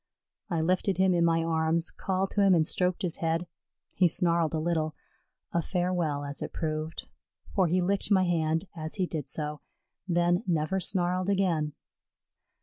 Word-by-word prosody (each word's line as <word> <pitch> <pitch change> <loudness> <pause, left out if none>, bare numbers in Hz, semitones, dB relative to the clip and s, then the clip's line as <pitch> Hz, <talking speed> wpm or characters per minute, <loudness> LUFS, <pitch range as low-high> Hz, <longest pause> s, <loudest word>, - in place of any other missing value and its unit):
I 170 -4 0
lifted 185 +3 +1
him 190 0 +4
in 170 -1 +3
my 165 -1 +3
arms, 165 0 0
called 190 0 -2
to 205 - +1
him 195 -2 +6
and 160 -2 +3
stroked 180 +3 0
his 175 -3 -1
head. 165 +1 0 0.5
He 180 - +4
snarled 170 -2 +1
a - - 0
little, 160 -1 -1 0.6
a 170 - +1
farewell 175 -5 -1
as 140 0 -5
it - - -4
proved, 155 0 -3 0.5
for 190 -3 +3
he 180 +3 +2
licked 195 +2 0
my 190 -3 +4
hand 165 -1 +1
as 155 -1 -5
he 190 -3 +1
did 155 -6 -4
so, 150 +1 -3 0.5
then 175 +1 +2
never 170 +2 +1
snarled 180 0 0
again. 170 -7 +1
170 Hz, 165 wpm, -28 LUFS, 160-185 Hz, 0.6 s, him